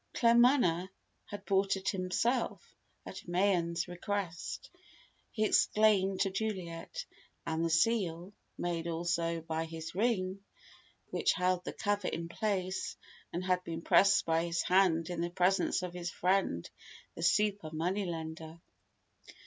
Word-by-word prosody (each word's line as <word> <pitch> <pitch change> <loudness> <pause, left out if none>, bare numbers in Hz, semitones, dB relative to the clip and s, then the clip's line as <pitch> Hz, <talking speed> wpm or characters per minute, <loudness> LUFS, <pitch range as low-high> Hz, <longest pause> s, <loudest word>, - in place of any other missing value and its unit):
Claremanagh 235 -7 +4 0.4
had 205 -1 -8
bought 195 0 +2
it 195 - -2
himself, 205 +6 -1 0.3
at - - -9
Mayen's 175 -2 +1
request, 180 -1 -4 0.6
he 215 -1 0
explained 205 -3 +3
to 195 - +2
Juliet; 195 - -4 0.4
and 165 0 -1
the 165 - +1
seal 180 0 +1 0.2
(made 170 -1 -2
also 170 0 -1
by 160 0 -3
his 160 0 -7
ring) 195 -2 0 0.7
which - - +2
held 180 -1 +1
the - - -4
cover 205 -2 -1
in 165 0 -3
place 190 -2 -2 0.5
had 180 0 +1
been 165 -1 -5
pressed 195 0 +5
by 165 0 +1
his 170 0 -1
hand 180 -2 +3
in 170 -1 -3
the 170 - -1
presence 180 +1 +1
of 180 -1 -4
his 175 -1 -4
friend, 180 - 0 0.5
the - - -8
"super 205 -1 +2
money 180 +6 -1
lender." 160 -1 -6
180 Hz, 130 wpm, -32 LUFS, 165-200 Hz, 0.7 s, pressed